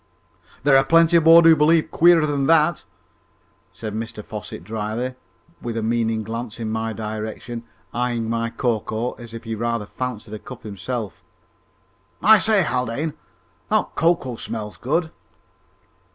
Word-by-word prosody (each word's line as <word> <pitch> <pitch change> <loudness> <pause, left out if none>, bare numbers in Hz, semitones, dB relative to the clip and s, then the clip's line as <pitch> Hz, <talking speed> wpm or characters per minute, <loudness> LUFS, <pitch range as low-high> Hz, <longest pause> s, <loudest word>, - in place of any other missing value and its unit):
"There 140 -1 +5
are 135 - +6
plenty 165 +2 +5
aboard 165 +1 +7
who 165 -1 +8
believe 155 +2 +3
queerer 170 0 +5
things 155 -1 0
than 140 -1 0
that!" 165 0 +3 0.9
said 110 -2 -7
Mr 110 -1 -6
Fosset 105 -5 -7
drily, 110 +5 -3 0.5
with 115 -1 -4
a 115 - -2
meaning 115 -1 0
glance 115 +1 -6
in 110 -1 -3
my 110 0 -2
direction, 110 +2 -6 0.3
eyeing 120 -2 -1
my 115 0 -1
cocoa 115 0 -2
as 115 -1 -9
if 115 - -8
he 115 -1 -4
rather 115 -1 -2
fancied 115 -2 -6
a 110 - -5
cup 125 +2 -11
himself. 105 0 -5 1.0
"I 220 0 +7
say, 210 -2 +3
Haldane, 130 +3 -2 0.6
that - - +1
cocoa 160 -7 +1
smells 105 -5 -5
good!" 160 +5 -1
120 Hz, 145 wpm, -22 LUFS, 110-150 Hz, 1.0 s, who